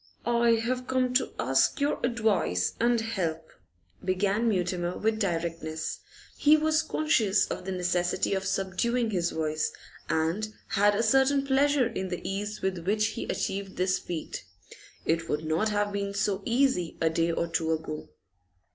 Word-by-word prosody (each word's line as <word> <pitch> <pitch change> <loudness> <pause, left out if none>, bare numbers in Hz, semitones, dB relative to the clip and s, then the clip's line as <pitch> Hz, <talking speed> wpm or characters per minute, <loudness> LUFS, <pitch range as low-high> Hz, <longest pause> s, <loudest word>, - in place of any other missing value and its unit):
'I 235 0 +3
have 250 +1 -2
come 255 -1 +1
to 255 - +1
ask 135 +2 +2
your 285 +1 0
advice 215 - +1
and 235 0 +3
help,' 170 -8 -3 0.5
began 200 +5 +1
Mutimer 180 -2 -1
with 220 0 0
directness. 165 -4 -2 0.4
He 300 +1 +5
was 310 0 +2
conscious 285 -11 +2
of - - -5
the 190 - -3
necessity 180 0 0
of 190 -1 -1
subduing 195 +5 0
his 175 -3 0
voice, 155 -1 -1 0.4
and 165 +7 0 0.2
had 205 -1 +3
a 225 - +1
certain 270 +4 +3
pleasure 275 0 +3
in 190 -5 -3
the 180 - -4
ease 205 +2 -4
with 190 -2 0
which 210 +1 +2
he - - -5
achieved 195 0 -3
this 185 +1 +1
feat. 170 -3 -5 0.6
It 165 +1 0
would 150 +1 -1
not 160 +8 +1
have 205 -1 0
been 200 0 -2
so 200 -1 0
easy 235 -8 +1
a 160 -1 +2
day 165 +1 +1
or 170 - 0
two 165 -1 -1
ago. 155 - -4
195 Hz, 155 wpm, -28 LUFS, 170-235 Hz, 0.6 s, He